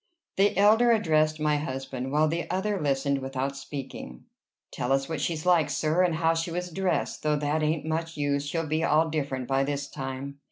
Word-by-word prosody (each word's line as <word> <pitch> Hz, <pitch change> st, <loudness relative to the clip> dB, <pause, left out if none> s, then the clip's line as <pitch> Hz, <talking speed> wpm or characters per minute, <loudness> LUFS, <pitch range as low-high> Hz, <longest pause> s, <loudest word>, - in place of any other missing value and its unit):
The 195 Hz, -1 st, +3 dB
elder 220 Hz, +4 st, +5 dB
addressed 155 Hz, -8 st, +2 dB
my 150 Hz, -1 st, +2 dB
husband, 135 Hz, -2 st, -4 dB
while 155 Hz, +2 st, +3 dB
the 165 Hz, +2 st, -2 dB
other 190 Hz, +1 st, -1 dB
listened 140 Hz, -1 st, +1 dB
without 135 Hz, +1 st, -3 dB
speaking. 135 Hz, -, -7 dB, 0.5 s
"Tell 125 Hz, -, -3 dB
us 135 Hz, 0 st, +2 dB
what 160 Hz, -3 st, -3 dB
she's 160 Hz, +1 st, -2 dB
like, 170 Hz, -5 st, +4 dB
sir, 155 Hz, +4 st, +1 dB
and 175 Hz, -3 st, +2 dB
how 165 Hz, 0 st, +2 dB
she 165 Hz, +1 st, -2 dB
was 180 Hz, +1 st, -4 dB
dressed 185 Hz, 0 st, -1 dB
though 150 Hz, 0 st, +1 dB
that 150 Hz, +1 st, 0 dB
ain't 155 Hz, 0 st, 0 dB
much 165 Hz, +1 st, -3 dB
use. 145 Hz, -1 st, 0 dB
She'll 165 Hz, +2 st, -1 dB
be 155 Hz, +1 st, -1 dB
all 160 Hz, 0 st, +3 dB
different 135 Hz, -5 st, -2 dB
by 135 Hz, 0 st, +2 dB
this 140 Hz, 0 st, -2 dB
time." 135 Hz, 0 st, -6 dB
155 Hz, 195 wpm, -27 LUFS, 140-165 Hz, 0.5 s, elder